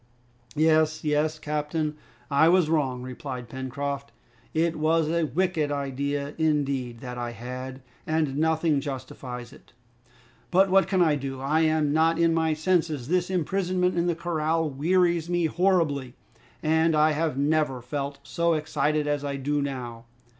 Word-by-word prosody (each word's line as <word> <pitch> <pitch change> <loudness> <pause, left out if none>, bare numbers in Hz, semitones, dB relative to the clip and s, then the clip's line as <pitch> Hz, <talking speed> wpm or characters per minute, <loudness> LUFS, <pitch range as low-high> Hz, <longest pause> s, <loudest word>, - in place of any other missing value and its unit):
"Yes, 155 0 +3
yes, 155 +1 +1
captain, 150 0 -2 0.4
I 155 +4 +5
was 175 -3 +3
wrong," 130 -6 0
replied 125 -1 -6
Pencroft; 140 +2 -4 0.4
"it 165 +1 +1
was 155 +1 +2
a 165 -1 +1
wicked 165 -3 0
idea 140 +1 -2
indeed 140 -6 0
that 125 -1 -6
I 120 -1 -4
had, 130 +3 -7 0.3
and 155 -3 0
nothing 160 -1 +2
justifies 130 -2 -7
it. 150 - -19 0.8
But 190 +1 +4
what 195 0 +5
can 190 -2 +3
I 160 -3 +3
do? 135 -1 -5
I'm 155 +1 +2
not 160 +1 +3
in 165 -1 +3
my 160 -1 +1
senses. 160 -5 0
This 180 0 +1
imprisonment 180 0 0
in 170 0 +1
the 170 - +1
corral 165 -1 0
wearies 170 +3 +1
me 175 -1 +1
horribly, 160 -7 +1 0.5
and 160 +1 +3
I 155 +1 +4
have 155 -2 -1
never 145 -2 +1
felt 140 +3 -4
so 170 +2 0
excited 150 0 0
as 145 -1 -1
I 140 -1 -2
do 145 +2 -1
now. 120 -4 -5
150 Hz, 145 wpm, -26 LUFS, 140-165 Hz, 0.8 s, I